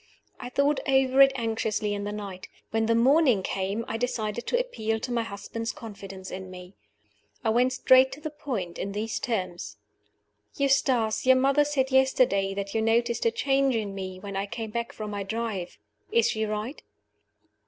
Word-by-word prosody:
I 245 - -6
thought 280 +3 +2
over 265 0 +4
it 270 0 +8
anxiously 220 -3 -1
in 205 0 -3
the 205 - -3
night. 200 -3 -7 0.2
When 225 0 +1
the 230 - +3
morning 255 - +4
came, 195 +5 -2
I 225 - -2
decided 225 -2 -2
to 485 - +2
appeal 225 - -2
to 250 - -5
my 235 -1 +1
husband's 225 +2 -5
confidence 195 -4 -9
in 185 0 -6
me. 180 0 -11 0.7
I 220 - +2
went 250 +3 +3
straight 260 +1 +5
to 280 - -9
the 305 0 -5
point 230 - -5
in 200 - -3
these 220 +2 -2
terms: 185 -9 -3 0.8
"Eustace, 260 -5 +1
your 260 - +8
mother 275 +3 +4
said 275 -2 0
yesterday 250 -7 +3
that 200 0 -4
you 225 - +1
noticed 235 - +2
a - - +3
change 275 - +1
in 210 -3 -2
me 185 -1 -6
when 200 +1 -7
I 195 +1 -2
came 220 +1 -5
back 235 +1 -3
from 215 -1 -6
my 205 -1 -3
drive. 200 -3 -4 0.3
Is 465 +1 +3
she 220 0 -1
right?" 215 +6 -4
225 Hz, 180 wpm, -27 LUFS, 200-260 Hz, 0.8 s, it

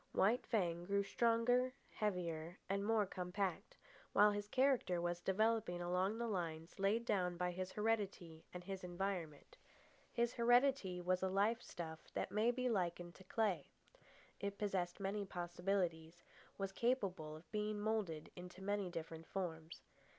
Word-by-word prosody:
White 220 +6 +3
Fang 175 -6 +1
grew 200 +1 +2
stronger, 240 +4 +3 0.2
heavier, 175 -4 -2
and 195 +1 0
more 215 0 +3
compact, 185 +1 -3 0.4
while 210 0 +7
his 205 0 -3
character 255 -8 +3
was 175 0 -1
developing 215 -2 +2
along 180 +4 +1
the 235 - -1
lines 170 -4 -3
laid 210 +4 +2
down 180 -5 +1
by 180 0 0
his 185 +1 -4
heredity 200 -7 -1
and 180 0 -7
his 190 0 -5
environment. 175 -4 -3 0.5
His 235 -1 +1
heredity 240 -5 +4
was 180 +1 +1
a 190 - +1
life 210 +5 +2
stuff 160 -2 -6 0.2
that - - -1
may 215 +3 +3
be 250 +1 +1
likened 175 -5 0
to 190 - -14
clay. 190 -5 0 0.7
It 200 0 -3
possessed 185 -4 -1
many 200 +1 -1
possibilities, 175 -2 -2 0.3
was 195 -1 -2
capable 195 -9 0
of 155 +2 -14
being 210 0 -1
moulded 205 -8 -1
into 180 +1 -9
many 200 -1 0
different 165 -1 -6
forms. 165 -4 -4
190 Hz, 145 wpm, -40 LUFS, 175-215 Hz, 0.7 s, while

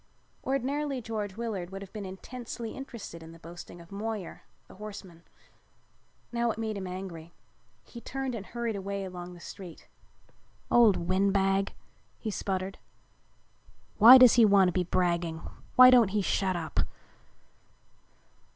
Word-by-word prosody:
Ordinarily 275 +1 -1
George 215 -4 -5
Willard 210 -7 -4
would 195 +1 -7
have 195 - -13
been 205 -3 -6
intensely 230 +4 -7
interested 235 -10 -8
in 160 0 -11
the - - -13
boasting 175 +1 -11
of 170 +1 -15
Moyer, 210 -2 -5 0.3
the - - -15
horseman. 195 -5 -9 1.1
Now 235 0 0
it 220 - -2
made 220 -1 -3
him 190 -2 -5
angry. 180 -3 -7 0.5
He 235 - -11
turned 270 0 -4
and 220 -4 -5
hurried 235 -2 -3
away 200 0 -4
along 180 -1 -8
the - - -13
street. 180 -1 -10 0.8
"Old 230 -5 +6
windbag," 195 +1 +1 0.4
he 220 - -4
sputtered. 190 -1 -3 1.2
"Why 235 +5 +11
does 255 -2 +8
he 240 - +6
want 200 -3 +5
to - - -4
be 180 - +1
bragging? 170 -2 0 0.3
Why 255 0 +10
don't 245 -4 +6
he 205 +1 -1
shut 190 0 0
up?" 165 -2 -4
200 Hz, 140 wpm, -29 LUFS, 185-230 Hz, 1.2 s, Why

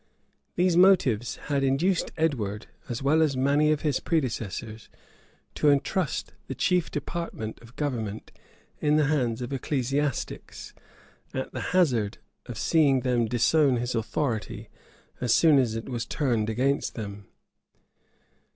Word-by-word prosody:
These 180 -1 +2
motives 135 - +4
had 140 -2 0
induced 160 +8 +1
Edward, 115 -10 -1 0.2
as 120 +2 -4
well 155 +4 +3
as 145 -4 +2
many 145 +3 +3
of 150 - 0
his 145 -4 0
predecessors, 115 - -3 0.6
to 150 - +2
intrust 145 +3 0
the - - -5
chief 180 -2 +1
departments 145 -7 -5
of 115 +1 -16
government 115 -8 -3 0.5
in 150 0 +2
the 155 -1 +4
hands 125 -6 0
of 125 - -5
ecclesiastics; 135 +1 -3 0.6
at - - -4
the - - -4
hazard 120 - +2 0.3
of 120 - -6
seeing 140 -4 +3
them 125 -3 +1
disown 130 +4 +3
his 120 +1 -2
authority 115 +1 -2 0.5
as 120 -2 +2
soon 155 -4 +5
as 120 -4 +1
it 115 - -5
was 120 -2 -4
turned 120 -7 0
against 135 +5 0
them. 100 -3 -7
135 Hz, 135 wpm, -26 LUFS, 115-150 Hz, 0.6 s, soon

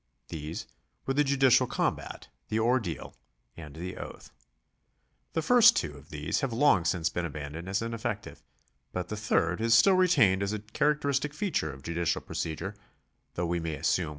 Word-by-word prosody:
These 80 0 -5 0.4
were 135 - 0
the 145 +2 +3
judicial 135 -2 +4
combat, - - -2 0.2
the 110 - 0
ordeal, 110 - 0 0.4
and 75 -3 -10
the 90 +3 -6
oath. - - -9 1.0
The 160 - -1
first 240 +4 +7
two 75 -3 -2
of 70 0 -15
these 75 -1 -2
have 135 - -1
long 115 - +3
since 80 -3 +1
been 85 - -2
abandoned 75 +2 -6
as 100 +4 0
ineffective, 115 -2 -4 0.5
but 90 -1 -3
the 105 - -3
third 100 -3 0
is 115 0 +4
still 195 +11 +6
retained 165 - +4
as 100 +1 -1
a - - -1
characteristic 140 +5 0
feature 150 - -1
of 70 0 -12
judicial 85 +1 -1
procedure, 85 +5 -4 0.6
1 90 - -1
See 85 0 -1
Bentham, - - -6
Works, 70 - +1
VII. 90 -3 -1
100 Hz, 170 wpm, -29 LUFS, 85-135 Hz, 1.0 s, first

